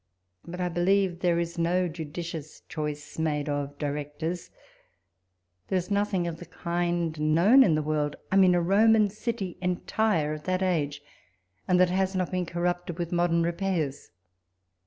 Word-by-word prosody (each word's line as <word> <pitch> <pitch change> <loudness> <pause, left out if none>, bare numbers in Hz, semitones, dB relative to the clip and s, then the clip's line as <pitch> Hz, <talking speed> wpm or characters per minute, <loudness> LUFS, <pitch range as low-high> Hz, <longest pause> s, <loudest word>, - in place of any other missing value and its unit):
But 180 +1 -7
I 180 - 0
believe 175 +1 +1
there 175 -2 +2
is 170 0 -3
no 180 +2 +2
judicious 160 -1 -7
choice 150 -1 -5
made 150 -2 0
of 145 -1 -3
directors. 150 +4 -4 1.2
There 190 - +1
is 180 +3 -4
nothing 200 -3 +1
of 170 -1 -4
the 175 - -11
kind 170 -2 -2
known 170 - +5
in 170 -12 +5
the 155 - 0
world; 150 -1 -1 0.2
I - - +2
mean 185 -2 +6
a 175 - +2
Roman 210 +3 +4
city 215 -4 -4
enlire 180 -3 0
of 155 0 -8
that 185 0 0
age, 145 -6 -1 0.6
and 180 -1 +3
that 180 -1 +4
has 190 +1 0
not 185 -1 -1
been 180 -2 -1
corrupted 175 0 -2
with 170 -2 -3
modern 170 -1 +2
repairs. 170 -5 -2
175 Hz, 155 wpm, -27 LUFS, 155-185 Hz, 1.2 s, mean